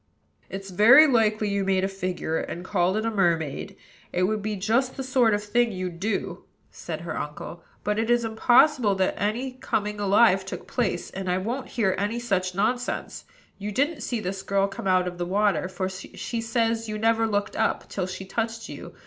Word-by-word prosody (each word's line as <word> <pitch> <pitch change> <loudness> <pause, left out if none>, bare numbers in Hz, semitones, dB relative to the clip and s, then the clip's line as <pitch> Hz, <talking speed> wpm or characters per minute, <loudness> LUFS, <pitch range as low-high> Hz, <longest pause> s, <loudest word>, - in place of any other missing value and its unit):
"It's 195 0 -7
very 235 - +8
likely 220 -5 +2
you 200 0 0
made 190 -1 +1
a - - +2
figure, 185 -4 -3
and 175 +2 -6
called 185 0 +1
it 220 - -1
a 225 - 0
mermaid: 170 -8 0 0.4
it 180 - 0
would 210 +3 0
be 210 +1 -2
just 230 +7 0
the 265 - -3
sort 250 -4 +3
of 205 - -3
thing 240 +2 +1
you'd 185 -3 -5
do," 195 -3 -3 0.3
said 160 -2 -6
her 170 - -5
uncle. 150 +3 -6 0.2
"But 210 +1 0
it 225 +1 -1
is 240 -1 +3
impossible 240 0 +4
that 190 -1 +1
any 235 +6 -1
coming 210 -5 -2
alive 200 -1 +4
took 190 - -7
place, 235 -7 -2
and 190 -1 -4
I 180 - +2
won't 235 +8 -3
hear 195 -5 +3
any 210 +4 -1
such 185 -6 -1
nonsense. 245 +5 -2 0.3
You 205 +1 -4
didn't 280 +6 0
see 235 0 -2
this 190 -1 -4
girl 195 0 +1
come 195 0 -6
out 185 -1 +3
of 175 0 -6
the 175 - -1
water; 200 -1 +1
for 185 0 -3
she 190 +5 -5
says 225 0 0
you 215 - -3
never 225 +1 +2
looked 205 -2 -1
up, - - 0
till 185 -2 -3
she 190 +1 -6
touched 225 +2 -3
you. - - -9
205 Hz, 200 wpm, -25 LUFS, 185-230 Hz, 0.4 s, very